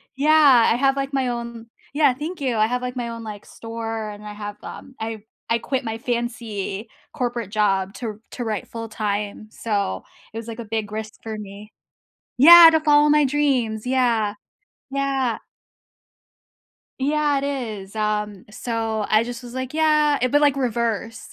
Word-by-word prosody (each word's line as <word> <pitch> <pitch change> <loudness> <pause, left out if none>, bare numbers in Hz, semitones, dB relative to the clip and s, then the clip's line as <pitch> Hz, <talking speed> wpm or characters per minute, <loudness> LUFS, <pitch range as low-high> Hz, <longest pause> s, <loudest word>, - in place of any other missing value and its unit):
Yeah, 285 -4 +5
I - - +3
have, 270 +2 +2
like, 275 0 -3
my 265 -2 +1
own 235 -1 -6 0.3
Yeah, 290 -3 +4
thank 310 +4 -6
you. 255 -4 0
I 215 +1 +3
have, 250 +1 -2
like, 250 0 -4
my 240 -1 -3
own, 230 0 -7
like, 210 -2 -8
store, 225 -1 -5
and 210 0 -10
I 210 - -7
have 205 0 -7
um, 265 - -10
I 220 -1 -5 0.3
I 230 0 +2
quit 265 +2 -2
my 225 -1 -4
fancy 230 -4 -4 0.2
corporate 240 -4 -3
job 195 -3 +1
to 220 -3 -6
to 245 - -5
write 215 -4 -3
full 225 -1 -7
time. 210 0 -3
So, 200 - -2 0.3
it - - -6
was, 230 0 -6
like, 230 0 -7
a 235 - -6
big 215 -1 -3
risk 220 0 -5
for 220 -1 -5
me 210 +1 -10 0.7
Yeah, 335 +5 +11
to 320 - +3
follow 295 -1 +5
my 300 -1 +5
dreams, 255 -6 0
yeah. 235 -5 +1 0.6
Yeah. 270 -4 -1 1.6
Yeah, 290 +1 +1
it 275 - -3
is. 220 -8 -5
Um, 210 -2 -2
so 225 -1 -2
I 215 +1 +4
just 245 +1 -7
was, 245 0 -10
like, 260 +1 -4
yeah. 305 -2 +3
It 255 0 +1
but 290 - +4
like 285 -2 +3
reverse, 230 -3 -2
235 Hz, 175 wpm, -22 LUFS, 215-270 Hz, 1.6 s, Yeah